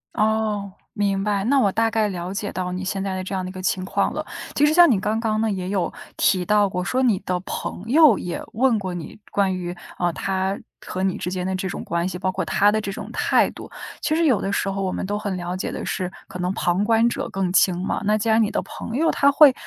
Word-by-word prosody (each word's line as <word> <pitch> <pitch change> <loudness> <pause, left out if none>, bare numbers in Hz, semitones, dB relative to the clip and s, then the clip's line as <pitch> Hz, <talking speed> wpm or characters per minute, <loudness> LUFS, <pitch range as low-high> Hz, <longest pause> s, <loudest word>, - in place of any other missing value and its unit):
哦， 215 -2 0 0.2
明 200 -2 0
白， 205 -1 0
那 270 +6 +3
我 205 -6 +3
大 225 +3 +2
概 220 -2 +2
了 180 -1 -4
解 200 +1 -3
到 180 -1 -3
你 185 +1 -4
现 195 0 -2
在 195 -1 -2
的 185 - -3
这 190 - -6
样 185 -1 -2
的 - - -5
一 - - -7
个 185 0 -7
情 185 0 -1
况 - - 0
了。 - - -4 0.3
其 290 - +4
实 300 - +3
像 345 0 +7
你 220 -7 +3
刚 210 +2 -1
刚 220 -1 0
呢 220 0 +1
也 185 -2 -3
有 190 -3 -1 0.2
提 185 -1 +3
到 210 0 +4
过， 180 -1 -3
说 255 +7 0
你 225 -7 +3
的 180 -1 -2
朋 185 - -5
友 285 - +6
也 175 - -4
问 240 -1 +3
过 185 -2 -4
你 175 +2 -7
关 195 -2 +1
于， 175 -1 -4 0.2
呃， 175 -1 +2
他 190 +2 -1 0.3
和 185 - -3
你 190 -1 0
之 - - -3
间 180 -1 -3
的 190 0 -1
这 185 0 -3
种 - - -5
关 170 +1 -1
系， 180 - -5
包 185 +1 -1
括 190 0 -2
他 205 +4 +3
的 215 +1 0
这 200 - -4
种 - - -7
态 - - +2
度。 - - -10 0.3
其 310 - +1
实 330 +1 +2
有 255 -9 +3
的 195 - -2
时 195 - 0
候 195 0 -2
我 190 -1 -1
们 - - -3
都 205 +2 -2
很 200 -3 -3
了 175 0 -4
解 185 - -3
的 - - -5
是， 180 -1 -2 0.2
可 180 - -8
能 180 0 0
旁 175 +1 +1
观 225 +2 +4
者 240 - -2
更 190 -2 -1
清 185 -2 +4
嘛。 185 - -2
那 210 +1 +3
既 215 +2 -1
然 220 +1 +5
你 215 - +2
的 - - -1
朋 230 - -7
友 325 +4 +3
他 280 - +4
会 285 -1 +7
195 Hz, 290 characters per minute, -23 LUFS, 185-220 Hz, 0.3 s, 像